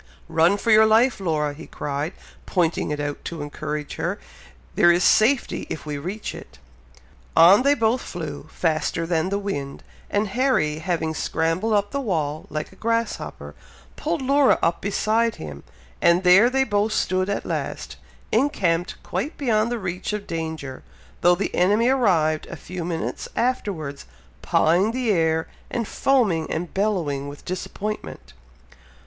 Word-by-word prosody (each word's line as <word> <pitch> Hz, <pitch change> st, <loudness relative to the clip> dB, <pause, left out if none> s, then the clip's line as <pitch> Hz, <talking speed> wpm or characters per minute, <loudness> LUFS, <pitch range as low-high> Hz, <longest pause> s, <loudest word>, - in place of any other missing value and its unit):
"Run 165 Hz, +5 st, +3 dB
for 225 Hz, -, 0 dB
your 220 Hz, 0 st, +7 dB
life, 225 Hz, +2 st, +4 dB
Laura!" 155 Hz, -5 st, 0 dB
he 160 Hz, +3 st, -11 dB
cried, 145 Hz, +4 st, -4 dB, 0.3 s
pointing 175 Hz, -3 st, 0 dB
it 150 Hz, -1 st, -2 dB
out, 145 Hz, 0 st, -4 dB
to 165 Hz, -3 st, -5 dB
encourage 150 Hz, 0 st, -5 dB
her. -, -, -2 dB, 0.6 s
"There 175 Hz, -, +5 dB
is 175 Hz, +1 st, +2 dB
safety, 240 Hz, +4 st, +3 dB
if 155 Hz, -, -5 dB
we 150 Hz, -1 st, -4 dB
reach 190 Hz, +8 st, -5 dB
it." -, -, -11 dB, 0.8 s
On 175 Hz, +7 st, +8 dB
they 280 Hz, +2 st, +4 dB
both 230 Hz, +1 st, +1 dB
flew, 155 Hz, -4 st, -6 dB
faster 165 Hz, 0 st, 0 dB
than 165 Hz, +1 st, 0 dB
the 200 Hz, -, 0 dB
wind, 145 Hz, -9 st, -4 dB, 0.3 s
and 205 Hz, 0 st, 0 dB
Harry 195 Hz, -, +1 dB
having 165 Hz, -2 st, -1 dB
scrambled 165 Hz, +8 st, 0 dB
up 205 Hz, -1 st, +1 dB
the 280 Hz, -, -2 dB
wall, 155 Hz, -, -2 dB
like 155 Hz, +1 st, -4 dB
a -, -, -16 dB
grasshopper, 230 Hz, 0 st, -3 dB, 0.4 s
pulled 315 Hz, -2 st, -2 dB
Laura 275 Hz, +1 st, +4 dB
up 170 Hz, +1 st, +1 dB
beside 220 Hz, +3 st, +1 dB
him, 70 Hz, -2 st, -8 dB, 0.4 s
and 170 Hz, +2 st, +4 dB
there 190 Hz, +6 st, +7 dB
they 265 Hz, +1 st, +2 dB
both 210 Hz, -2 st, 0 dB
stood 185 Hz, -1 st, 0 dB
at 200 Hz, -, -2 dB
last, -, -, -4 dB, 0.3 s
encamped 195 Hz, -, +1 dB
quite 300 Hz, +5 st, -3 dB
beyond 230 Hz, -4 st, +1 dB
the 240 Hz, -, -1 dB
reach 180 Hz, 0 st, -4 dB
of 210 Hz, -1 st, -4 dB
danger, 160 Hz, -5 st, -5 dB, 0.4 s
though 175 Hz, 0 st, +5 dB
the 200 Hz, -, -3 dB
enemy 210 Hz, +7 st, +3 dB
arrived 170 Hz, -12 st, +2 dB
a -, -, -7 dB
few 180 Hz, -1 st, -7 dB
minutes 165 Hz, -1 st, -3 dB
afterwards, 185 Hz, -, -2 dB, 0.3 s
pawing 180 Hz, +8 st, +2 dB
the 250 Hz, -3 st, 0 dB
air, 160 Hz, -3 st, +1 dB, 0.2 s
and 230 Hz, -3 st, -2 dB
foaming 205 Hz, -15 st, +1 dB
and 170 Hz, +2 st, -3 dB
bellowing 170 Hz, -9 st, -1 dB
with 145 Hz, 0 st, -10 dB
disappointment. 190 Hz, -, -5 dB
180 Hz, 155 wpm, -23 LUFS, 160-220 Hz, 0.8 s, On